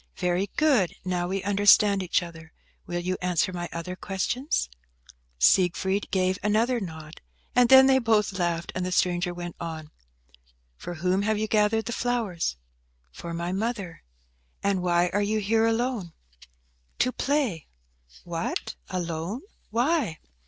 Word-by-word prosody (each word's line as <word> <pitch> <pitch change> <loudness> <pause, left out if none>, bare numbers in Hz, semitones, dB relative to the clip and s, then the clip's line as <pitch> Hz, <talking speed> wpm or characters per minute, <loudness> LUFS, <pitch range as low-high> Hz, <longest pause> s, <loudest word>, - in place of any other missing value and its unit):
"Very 180 +2 0
good. 270 - +3
Now 180 -1 -1
we 195 +1 -2
understand 205 0 +5
each 180 0 +1
other. 160 -2 -11 0.3
Will 175 0 -2
you 185 +1 -2
answer 180 0 0
my 175 -1 -4
other 170 +2 -5
questions?" 220 - -1 0.7
Siegfried 190 - +2
gave 185 0 +1
another 225 +4 +2
nod, 160 -5 -8 0.3
and 245 -1 +5
then 265 0 +9
they 265 0 +5
both 220 -4 +2
laughed, 175 -2 -1
and 185 - -2
the 185 - -2
stranger 180 -1 +1
went 175 -1 -7
on. 160 -2 -6 0.8
"For 175 - -7
whom 180 +4 +1
have 215 +1 +1
you 215 +1 -1
gathered 215 +1 +2
the 235 - -4
flowers?" 220 - -1 0.5
"For 170 - -8
my 170 +1 -3
mother." 200 -3 -3 0.6
"And 200 -2 +1
why 175 0 +2
are 205 - +2
you 210 +2 0
here 220 +2 +2
alone?" 225 -6 -1 0.8
"To 255 - +2
play." 265 - -1 0.6
"What, - - -3 0.2
alone? 175 +6 -3 0.3
Why?" 240 - +1
190 Hz, 140 wpm, -26 LUFS, 175-220 Hz, 0.8 s, then